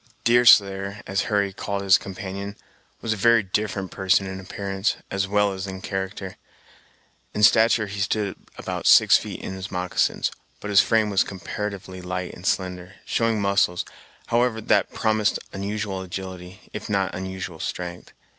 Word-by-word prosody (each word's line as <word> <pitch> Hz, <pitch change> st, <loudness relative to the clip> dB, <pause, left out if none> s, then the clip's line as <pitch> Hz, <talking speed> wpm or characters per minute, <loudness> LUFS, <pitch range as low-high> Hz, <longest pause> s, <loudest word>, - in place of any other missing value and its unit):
Deerslayer, 100 Hz, -4 st, +5 dB
as 95 Hz, 0 st, -1 dB
Hurry 100 Hz, -2 st, +1 dB
called 100 Hz, +1 st, -3 dB
his 95 Hz, -1 st, +6 dB
companion, 100 Hz, +1 st, -6 dB, 0.5 s
was 110 Hz, -, 0 dB
a -, -, -6 dB
very 115 Hz, +2 st, +5 dB
different 95 Hz, 0 st, -2 dB
person 95 Hz, 0 st, +2 dB
in 95 Hz, 0 st, -5 dB
appearance, 95 Hz, +1 st, -2 dB, 0.2 s
as 100 Hz, 0 st, 0 dB
well 105 Hz, 0 st, +2 dB
as 95 Hz, +1 st, -5 dB
in 95 Hz, -1 st, -6 dB
character. 95 Hz, 0 st, -5 dB, 1.0 s
In 105 Hz, -, 0 dB
stature 110 Hz, 0 st, +5 dB
he 100 Hz, 0 st, -6 dB
stood 100 Hz, 0 st, -1 dB, 0.2 s
about -, -, -3 dB
six -, -, +8 dB
feet -, -, -7 dB
in -, -, -5 dB
his 95 Hz, 0 st, -6 dB
moccasins, 90 Hz, -1 st, 0 dB, 0.3 s
but 105 Hz, -, -5 dB
his 100 Hz, -, +7 dB
frame 110 Hz, -2 st, +2 dB
was 95 Hz, -, +4 dB
comparatively 95 Hz, -1 st, -6 dB
light 90 Hz, 0 st, -4 dB
and 90 Hz, -, -7 dB
slender, 90 Hz, 0 st, -2 dB
showing 115 Hz, -2 st, +1 dB
muscles, 100 Hz, -3 st, +1 dB, 0.4 s
however, 120 Hz, -1 st, +1 dB
that 110 Hz, -, +2 dB
promised 110 Hz, -2 st, +1 dB, 0.2 s
unusual 100 Hz, 0 st, -3 dB
agility, 95 Hz, 0 st, -8 dB
if -, -, -6 dB
not 100 Hz, -3 st, 0 dB
unusual 95 Hz, -2 st, -5 dB
strength. 90 Hz, 0 st, -5 dB
100 Hz, 155 wpm, -24 LUFS, 95-105 Hz, 1.0 s, six